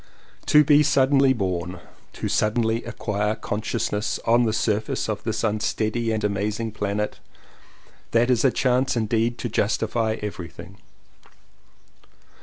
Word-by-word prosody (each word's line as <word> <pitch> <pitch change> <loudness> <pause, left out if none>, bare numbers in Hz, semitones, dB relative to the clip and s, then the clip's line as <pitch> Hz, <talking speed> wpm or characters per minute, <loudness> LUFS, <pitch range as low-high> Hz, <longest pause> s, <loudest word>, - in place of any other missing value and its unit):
To 150 0 +6
BE 145 0 +5
suddenly 135 -2 +4
born, 90 -6 -2 0.3
to - - -4
suddenly 110 +1 +1
acquire 105 -3 -2
consciousness 105 0 -2
on 120 +1 +4
the 110 - +1
surface 110 0 -1
of 110 -1 -3
this 110 -1 -2
unsteady 110 +1 -1
and 110 -1 -2
amazing 105 +2 -1
planet, 105 0 -3 0.9
that 120 +2 +3
is 120 -2 +2
a 135 - +5
chance 125 0 +1
indeed 115 +2 0
to - - -3
justify 110 +1 0
everything. 90 -2 -8
110 Hz, 120 wpm, -24 LUFS, 105-120 Hz, 0.9 s, To